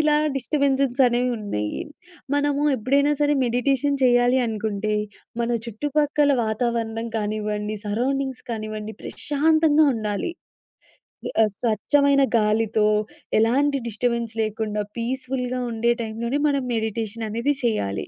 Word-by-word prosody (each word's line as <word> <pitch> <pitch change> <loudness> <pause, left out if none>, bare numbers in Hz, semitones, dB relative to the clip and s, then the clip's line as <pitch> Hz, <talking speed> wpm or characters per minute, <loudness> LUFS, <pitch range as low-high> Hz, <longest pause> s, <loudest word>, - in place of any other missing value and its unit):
ఇలా 300 -1 +4 0.2
డిస్టర్బెన్సెస్ 275 -1 +1
అనేవున్నాయి. 230 - -1 0.5
మనము 290 0 +1
ఎప్పుడైనా 280 +6 +2
సరే 295 0 +3
మెడిటేషన్ 270 +4 +1
చేయాలి 245 +1 +4
అనుకుంటే, 215 -1 -2 0.5
మన 235 - -1 0.2
చుట్టుపక్కల 290 +5 +1
వాతావరణం 225 0 -1
కానివ్వండి, 210 0 -2
సరౌండింగ్స్ 265 +4 -1
కానివ్వండి, 215 -1 -5
ప్రశాంతంగా 310 +1 +2
ఉండాలి. 215 - -2 1.1
ఆహ్, 210 - +1
స్వచ్ఛమైన 275 +5 +3 0.2
గాలితో, 215 0 +2 0.5
ఎలాంటి 275 +5 +2
డిస్టర్బెన్స్ 235 0 -2
లేకుండా 215 -1 -2
పీస్‌ఫుల్‌గా 255 +1 -2
ఉండే 235 +1 +2
టైమ్‌లోనే 235 +5 -2
మనం 280 -2 0
మెడిటేషన్ 220 0 -3
అనేది 255 +6 0
చేయాలి. 100 - -1
235 Hz, 100 wpm, -23 LUFS, 220-275 Hz, 1.1 s, ఇలా